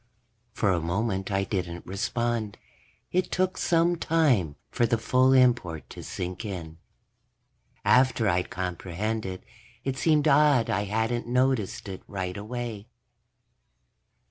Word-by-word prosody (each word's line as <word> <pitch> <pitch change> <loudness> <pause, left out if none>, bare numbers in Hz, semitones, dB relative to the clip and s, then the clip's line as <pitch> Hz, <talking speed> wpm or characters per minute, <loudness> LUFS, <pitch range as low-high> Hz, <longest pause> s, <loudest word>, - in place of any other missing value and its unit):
For 105 -2 +1
a 85 -2 +1
moment 95 +3 -1
I 95 -1 +1
didn't 90 -4 -4
respond. 110 +2 -2 0.5
It 185 +1 0
took 185 0 +1
some 170 +1 +2
time 135 - +2 0.2
for 120 - +2
the 115 - +2
full 130 +3 +3
import 120 -11 +3
to - - -8
sink 90 +3 -5
in. 85 -6 -6 1.1
After 125 -3 +4
I'd 90 -2 +1
comprehended, 95 +2 -3 0.4
it 135 0 -2
seemed 155 -2 +3
odd 145 -4 +4
I 100 +2 0
hadn't 110 +3 -1
noticed 125 -3 0
it 95 -1 -6
right 95 -2 -4
away. 110 0 -5
110 Hz, 120 wpm, -27 LUFS, 95-125 Hz, 1.1 s, After